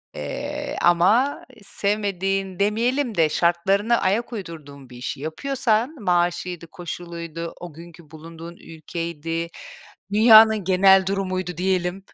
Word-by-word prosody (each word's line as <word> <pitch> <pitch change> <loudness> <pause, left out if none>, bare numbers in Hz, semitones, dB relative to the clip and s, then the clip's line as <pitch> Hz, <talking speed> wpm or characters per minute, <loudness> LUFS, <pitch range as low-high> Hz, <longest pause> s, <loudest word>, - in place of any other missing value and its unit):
Eee, 290 0 -5
ama 205 +11 +3 0.2
sevmediğin 195 -2 -2
demeyelim 235 +4 0
de 160 -2 +3
şartlarına 195 +8 +1
ayak 225 +6 0
uydurduğun 150 - -9
bir 125 - -12
işi 130 +1 -5
yapıyorsan 245 - -1
maaşıydı, 175 -1 -1
koşuluydu, 170 -2 -7
o 175 -3 -8
günkü 165 -1 -14
bulunduğun 165 +2 -11
ülkeydi, 165 0 -5 0.7
dünyanın 220 -1 +7
genel 190 0 +5
durumuydu, 185 -3 -3
diyelim. 185 0 -1
180 Hz, 105 wpm, -22 LUFS, 170-210 Hz, 0.7 s, dünyanın